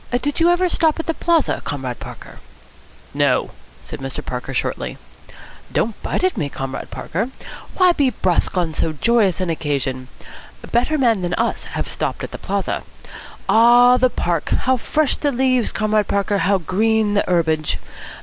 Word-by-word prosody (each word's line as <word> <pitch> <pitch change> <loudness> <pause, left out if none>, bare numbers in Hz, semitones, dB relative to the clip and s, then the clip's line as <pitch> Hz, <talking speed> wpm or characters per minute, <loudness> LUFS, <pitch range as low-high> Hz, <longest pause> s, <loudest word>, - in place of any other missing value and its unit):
"Did 290 +4 -2
you 335 +1 +5
ever 350 +1 +3
stop 325 -2 +1
at 325 - -3
the 330 - -1
Plaza, 330 -2 +1
Comrade 130 -4 -4
Parker?" - - -10 0.7
"No," - - +1 0.3
said - - -8
Mr. 135 0 -6
Parker 125 +1 -5
shortly. 130 - -2 0.7
"Don't 220 -1 -1
bite - - -2
at 370 - +2
me, 150 -6 -1
Comrade 135 -1 -5
Parker. 215 +9 -3 0.5
Why 365 -1 +6
be 285 -6 +2
brusque 185 -5 0
on 170 -3 0
so 160 - -1
joyous 205 - +2
an 185 -2 -1
occasion? 135 -5 -2 0.6
Better 250 +6 +2
men 230 -7 +2
than 175 0 -1
us 230 +1 -1
have - - -2
stopped - - -3
at - - -5
the - - -7
Plaza. - - -2 0.7
Ah, 240 +2 +6
the 255 0 +3
Park! 170 -8 -2
How 260 +1 +2
fresh 295 +4 0
the 290 - 0
leaves, 255 -1 +1
Comrade 215 -1 +1
Parker, 200 0 0
how 195 +3 +3
green 210 +4 +1
the 205 - +2
herbage! 160 -3 +1
215 Hz, 165 wpm, -20 LUFS, 165-255 Hz, 0.7 s, Why